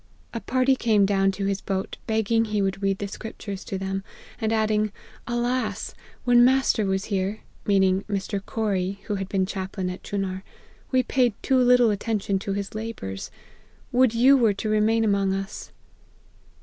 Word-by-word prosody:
A 230 - -2
party 255 +3 +2
came 220 -5 +3
down 195 -1 +2
to 195 +1 -3
his 195 0 -1
boat, 190 -1 -3
begging 225 0 +2
he 215 -1 -1
would 195 0 -1
read 195 -1 +1
the 200 - -4
scriptures 200 -1 -7
to 195 - -3
them; 195 0 -3 0.4
and 220 -2 0
adding, 215 -1 +1 0.4
Alas! 240 -3 -1 0.3
when 245 -1 +6
master 255 -5 +3
was 190 +1 0
here,' 195 +3 -1 0.3
(mean 200 -2 +4
ing 190 0 +2
Mr. 200 0 -2
Corrie, 200 -3 -2
who - - -3
had 195 -1 -4
been 190 -1 +1
chaplain 190 -1 -4
at 180 - -8
Chunar,) 190 -2 -3 0.3
' - - -30
we 255 -1 +3
paid 245 -3 +2
too 265 -1 +3
little 245 -2 +5
attention 205 -1 -1
to 195 0 -3
his 200 0 -4
labours. 215 - -5 0.6
Would 250 -2 +3
you 260 +4 +6
were 230 -6 +4
to 215 - -3
remain 215 +1 +3
among 200 -2 +2
us 195 +2 -6
205 Hz, 175 wpm, -25 LUFS, 195-230 Hz, 0.6 s, when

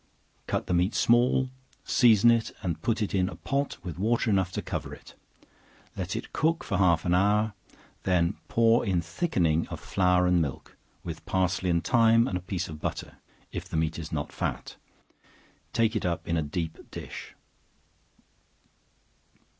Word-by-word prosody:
Cut - - -1
the 90 - -1
meat 90 +4 +1
small, 125 +2 +3 0.3
season 120 -2 +5
it, 115 -1 0
and 85 -4 -2
put 115 -1 0
it 105 - -3
in 90 -1 +2
a - - -8
pot 140 +1 -2
with 85 -2 -6
water 115 +2 +1
enough 95 -2 +1
to - - -2
cover - - -4
it; - - -16 0.8
let 95 0 -3
it - - -6
cook 165 +2 +1
for - - -2
half 85 -4 +3
an 90 - +2
hour; 105 +3 +2 0.5
then 85 -3 +1
pour 115 0 +3
in 95 -3 +1
thickening 85 - 0
of - - -7
flour 90 -1 +2
and 90 -1 +3
milk, 70 -5 -5 0.3
with 85 -2 -7
parsley 95 0 0
and 85 -1 +1
thyme, 115 0 +4
and 95 - -3
a 90 - -2
piece 90 0 -3
of 75 -2 -9
butter, - - -4 0.3
(if - - -6
the - - -3
meat 80 +1 -1
is 80 -1 -7
not 75 -1 -3
fat;) - - -4 1.0
take 115 -1 +1
it 110 - -1
up 85 -2 -2
in 85 - 0
a 80 - +1
deep 80 +2 -5
dish. - - -8
95 Hz, 170 wpm, -27 LUFS, 85-115 Hz, 1.0 s, season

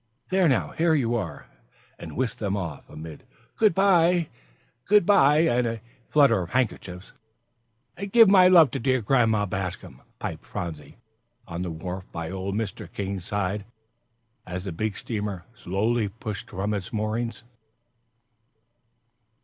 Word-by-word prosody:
"There 185 -2 +3
now, 130 - +1
here 165 -1 +2
you 120 -5 +1
are!" 120 - -4 0.5
and - - -8
whisked 125 -1 -2
them 100 -2 -1
off, 85 -7 -6
amid 80 -1 -10 0.3
"good 215 -6 +3
by 175 -4 +4 0.6
good 210 -3 +5
by" 150 -6 +5
and 125 -7 +2
a 115 -1 -4 0.3
flutter 140 -9 +4
of 85 - -6
handkerchiefs. 100 -7 -2 0.9
"And 200 +2 -6
give 230 0 +8
my 190 -2 +7
love 170 -7 +7
to - - -3
dear 130 -1 +1
Grandma 110 -3 +3
Bascom," 95 -2 -5 0.2
piped - - -5
Phronsie, 80 -5 -7 0.5
on 85 +1 -5
the 90 - -3
wharf 90 +3 -6
by 85 0 -5
old 95 +1 -4
Mr. 110 -3 -4
King's 95 -2 -4
side, 100 0 -2 0.8
as 90 0 -6
the 95 - -5
big 105 +4 -3
steamer 105 -5 -4
slowly 110 +2 -1
pushed 105 0 -7
from 100 +3 -2
its 100 -3 -4
moorings. 110 +1 -3
110 Hz, 140 wpm, -25 LUFS, 95-140 Hz, 0.9 s, give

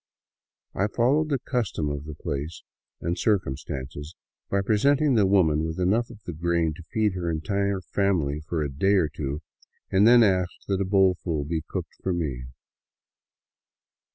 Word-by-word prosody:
I 100 - +1
followed 135 +8 +2
the 140 - +1
custom 120 - -2
of 70 0 -5
the 75 -1 -7
place 75 +4 -5 0.4
and 85 +2 -2
circum 95 -11 +1
stances 70 +5 -7 0.3
by 100 0 +1
presenting 140 +8 +3
the 105 -5 +4
women 80 -6 +3
with 80 +2 -3
enough 105 +7 +1
of 110 -3 -13
the 85 - -6
grain 85 0 0
to 85 - -11
feed 110 -3 +1
her 90 -2 -3
entire 100 +4 -1
family 85 -8 0
for 80 -3 -1
a 70 - -3
day 95 +9 +2
or 85 -6 +2
two, 75 -1 -4 0.5
then 115 +5 +6
asked 95 -3 0
that 100 -1 0
a - - +1
bowlful 90 -5 +2
be 80 +1 -2
cooked - - -6
for 95 - -1
me. 70 -8 -3
90 Hz, 160 wpm, -26 LUFS, 80-100 Hz, 0.5 s, then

